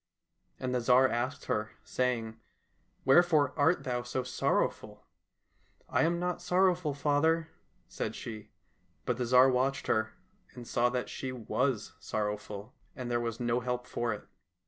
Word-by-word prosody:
And 130 -1 -2
the 125 - +1
Tsar 125 +2 +5
asked 130 +3 -2
her, 105 -1 -2
saying, 115 -3 -1 0.3
" - - -41
Wherefore 150 -1 +5
art 160 +4 +3
thou 125 -1 -1
so 120 +2 -3
sorrowful? 125 - -1 0.2
" - - -53
— - - -38
" - - -42
I - - +2
am 170 +1 +2
not 180 0 -2
sorrowful, 180 -4 +2
father," 155 +3 +2 0.4
said - - -4
she. 110 -1 -7 0.6
But 125 - 0
the 125 - -1
Tsar 125 +2 +7
watched 130 +2 0
her, 110 0 0 0.4
and 120 -1 -9
saw 120 +1 +2
that 125 0 -2
she 130 - -5
was 125 -1 -1
sorrowful, 105 -1 -4 0.2
and 125 -1 -5
there 120 - +2
was 115 -1 -3
no 120 0 +1
help 125 0 -3
for 120 -1 -2
it. 105 - -5
125 Hz, 165 wpm, -31 LUFS, 120-140 Hz, 0.6 s, Tsar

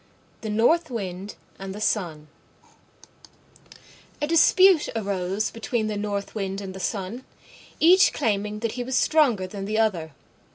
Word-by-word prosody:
THE 220 - -5
NORTH 280 +10 +2
WIND 195 -4 -5 0.2
AND 195 0 -6
THE - - -7
SUN 170 -8 -2 1.9
A 295 - 0
dispute 335 +2 +5
arose 195 -1 -2
between 230 0 -2
the 215 -1 -2
North 205 -1 -3
Wind 195 -2 -3
and 195 -2 -7
the 190 - -8
Sun, 195 +6 -4 0.6
each 365 +4 +6
claiming 210 -1 -2
that 230 -1 -1
he 245 +2 -4
was 255 +1 -3
stronger 265 -12 +3
than 195 +1 -7
the 215 +2 -2
other. 180 -9 0
210 Hz, 140 wpm, -24 LUFS, 195-240 Hz, 1.9 s, each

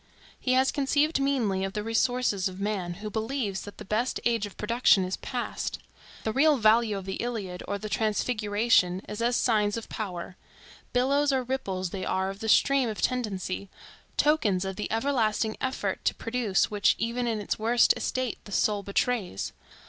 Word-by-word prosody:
He 255 - +1
has 260 +1 +4
conceived 290 +2 +1
meanly 240 -9 +1
of 195 0 -3
the 210 - -3
resources 225 -3 +1
of 185 +1 -10
man, 195 -4 -2
who - - -2
believes 220 -2 -2
that 205 - -10
the - - -9
best 220 +6 0
age 230 -3 +1
of 200 - -15
production 210 -3 +3
is 185 - -2
past. 245 -1 -4 0.5
The 220 - -1
real 295 +3 +4
value 220 -1 +4
of 195 - -7
the 190 0 -4
Iliad 205 -7 -4
or 200 - -1
the 215 - -6
Transfiguration 215 -3 +1
is 210 +2 -5
as 240 +1 +2
signs 210 -3 +2
of 230 - -7
power; 185 -3 -5 0.5
billows 280 +3 +2
or 260 -1 +1
ripples 195 -8 -3
they 190 -1 -4
are 190 +1 0
of 195 - -11
the 220 - -3
stream 275 +1 +4
of 215 - -5
tendency; 200 -6 -2 0.5
tokens 210 -12 +2
of 190 0 -3
the 210 - -4
everlasting 225 -3 +1
effort 260 0 -2
to - - +2
produce, 230 -5 0
which 205 -1 +3
even 235 +2 -1
in 225 -2 0
its 205 - -3
worst 235 +2 +4
estate 255 -2 -2
the 205 - -11
soul 205 +1 +1
betrays. 200 - -1
220 Hz, 180 wpm, -27 LUFS, 200-250 Hz, 0.5 s, has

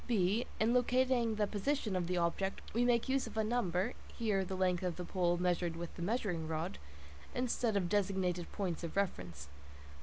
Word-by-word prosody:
(b) 215 0 +2
In 225 +2 +3
locating 250 -2 +3
the 210 -1 +2
position 215 +1 -1
of 175 -2 0
the 180 0 0
object, 175 +3 0
we 235 +3 +3
make 240 0 +3
use 265 0 +1
of - - -9
a 220 - +3
number 215 -2 0 0.2
(here 210 -5 +1
the 190 0 -4
length 180 -2 +2
of 180 -3 -1
the 180 - -5
pole 175 -1 +1
measured 175 -1 +1
with 170 0 -6
the - - -7
measuring 180 -5 -1
rod) 155 - -3 0.6
instead 240 -3 +1
of 185 -3 +1
designated 185 -3 0
points 180 -5 -2
of 165 - -4
reference. 90 - -2
190 Hz, 185 wpm, -35 LUFS, 175-230 Hz, 0.6 s, In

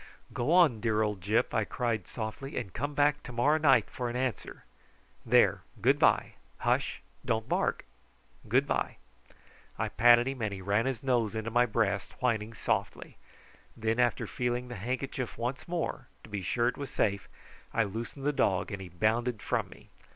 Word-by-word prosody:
"Go 125 +6 -1
on, 170 -10 +5
dear 110 -2 +2
old 105 -3 -2
Gyp," 105 +5 +1
I 110 - +2
cried 115 -2 -2
softly; 115 +5 -6
"and 100 -7 -4
come 145 +4 -3
back 145 +1 +3
to - - -9
morrow 145 +6 +2
night 135 -8 +5
for 125 -1 -4
an 120 - -5
answer. 125 -2 -3 0.6
There, - - +4 0.2
good - - +3
bye. - - +3 0.3
Hush! - - 0 0.2
don't 110 -1 -1
bark. - - 0 0.6
Good - - +4
bye!" - - -1 0.8
I - - -1
patted 120 +1 +5
him, 135 -2 -4
and 110 -2 -1
he - - -8
ran 100 +6 +1
his 130 -3 -3
nose 120 -5 +1
into 110 +1 -3
my 120 +1 +4
breast, 105 -3 0
whining 115 -3 0
softly. - - -2 0.6
Then 115 +1 0
after 120 -2 +2
feeling 125 0 -2
the 120 - -6
handkerchief 130 +4 -3
once 125 +5 -3
more, 170 -7 -3 0.2
to - - -13
be 105 -2 -3
sure 120 +6 +1
it 125 - -1
was 140 - -5
safe, 100 -2 -1 0.4
I 115 - +2
loosened 115 +7 -6
the 145 - +2
dog 95 -6 +1
and 100 -1 -5
he 95 - -8
bounded 110 +6 0
from - - -1
me. - - -16
120 Hz, 180 wpm, -30 LUFS, 110-130 Hz, 0.8 s, on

